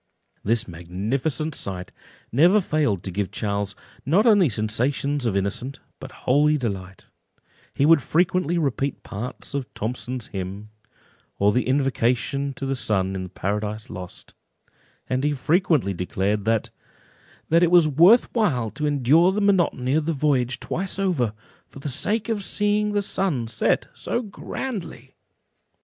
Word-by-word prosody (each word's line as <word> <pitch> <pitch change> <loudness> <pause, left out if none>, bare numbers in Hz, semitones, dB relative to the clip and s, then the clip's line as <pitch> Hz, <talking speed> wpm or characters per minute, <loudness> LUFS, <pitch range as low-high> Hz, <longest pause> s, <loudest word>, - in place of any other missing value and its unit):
This 115 +2 0
magnificent 110 - -2
sight 90 -6 -3 0.4
never 175 - +5
failed 150 - 0
to 95 - -4
give 100 +1 -2
Charles 100 -1 -2 0.3
not 180 - +3
only 205 - +5
sensations 125 +5 0
of 100 -3 0
innocent, 110 +8 -3 0.2
but 130 - -9
holy 150 +4 +4
delight; 95 - -5 0.7
he 140 - +2
would 160 -1 +6
frequently 175 +2 +1
repeat 140 -3 -1
parts 120 +6 -7
of 140 -2 -3
Thomson's 125 +2 -4
hymn, 100 +3 -6 0.7
or 100 +1 +3
the 125 +4 0
invocation 135 0 0
to 135 - -5
the 135 - -1
sun 95 -7 0
in 95 - -3
the 90 - -6
Paradise 105 +3 -3
Lost; 90 -1 -9 0.7
and 130 +1 -1
he 150 0 +1
frequently 155 - +2
declared 95 +3 -1
"that 110 -1 0 0.8
it 170 +1 +5
was 175 -3 +6
worth 170 - +6
while 130 - +1
to 150 -1 -2
endure 145 +6 +4
the 200 - -1
monotony 175 -10 +2
of 155 0 +1
the 165 - +1
voyage 135 -4 0
twice 190 +2 -2
over, 175 - +1 0.4
for - - -15
the 140 +2 -5
sake 205 - 0
of 220 -3 -1
seeing 210 +1 +1
the 205 -1 +1
sun 165 -13 -1
set 110 - 0
so 240 - -3
grandly." 195 - -6
135 Hz, 145 wpm, -24 LUFS, 105-165 Hz, 0.8 s, would